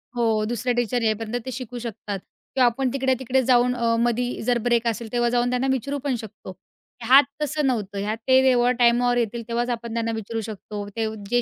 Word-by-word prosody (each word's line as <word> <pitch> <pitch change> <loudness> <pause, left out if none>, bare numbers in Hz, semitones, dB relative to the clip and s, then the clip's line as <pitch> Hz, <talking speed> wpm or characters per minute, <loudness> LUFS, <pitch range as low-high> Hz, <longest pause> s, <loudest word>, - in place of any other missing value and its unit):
हो. 225 -3 +1
दुसरे 240 +2 -1
टीचर 240 0 0
येईपर्यंत 220 +1 -1
ते 260 - -4
शिकू 250 -1 -6
शकतात. 210 -4 -5 0.4
किंवा 255 -2 +5
आपण 255 +2 +1
तिकडे-तिकडे 260 -1 +1
जाऊन 250 0 +3
अ, 230 -1 +1
मधी 240 +1 0
जर 245 -1 +2
ब्रेक 235 -1 +2
असेल, 225 -1 -3
तेव्हा 240 -1 +1
जाऊन 245 0 +1
त्यांना 250 +2 0
विचारू 275 +2 -2
पण 270 -3 0
शकतो. 205 -3 -10 0.5
ह्यात 265 +5 +7 0.2
तसं 300 0 -1
नव्हतं. 205 -5 -2
ह्यात 210 +2 -2
ते 260 0 +6
जेव्हा 250 -1 +4
टाईमावर 245 +1 +4
येतील 235 0 -1
तेव्हाच 240 +1 -1
आपण 235 -1 -4
त्यांना 230 0 -1
विचारू 225 +1 -4
शकतो. 210 -1 -7
ते 225 -1 0 0.2
जे 245 0 +2
240 Hz, 195 wpm, -23 LUFS, 225-250 Hz, 0.5 s, ह्यात